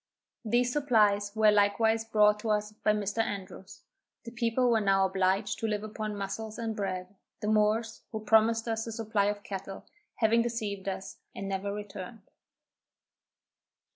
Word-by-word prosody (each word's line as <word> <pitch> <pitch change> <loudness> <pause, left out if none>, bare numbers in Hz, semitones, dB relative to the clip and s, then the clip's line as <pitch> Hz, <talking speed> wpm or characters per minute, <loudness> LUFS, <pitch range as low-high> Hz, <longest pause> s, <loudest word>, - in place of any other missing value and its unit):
These 240 +2 +1
supplies 210 -8 +3
were 215 -1 +5
likewise 220 +2 +2
brought 210 -1 +3
us 210 -1 0
by 215 0 0
Mr. 210 +1 -2
Andrews. 195 -3 -6 0.4
The 230 - -8
people 240 +1 +1
were 225 -2 +3
now 195 -1 +3
obliged 190 +2 0
to 225 - -1
live 210 -1 -2
upon 215 -1 -5
muscles 215 +2 -5
and 225 -2 -3
bread, 185 -2 -4 0.3
the 210 - -4
Moors, 215 +1 +1
who 220 - -3
promised 225 +1 +3
us 225 0 -2
a - - -4
supply 220 -2 0
of 205 0 -2
cattle, 195 0 -7 0.3
having 230 +1 +3
deceived 210 -5 -3
us, 190 0 -6 0.2
and 195 - -5
never 195 +1 -2
returned. 205 +1 -7
210 Hz, 150 wpm, -29 LUFS, 200-225 Hz, 0.4 s, were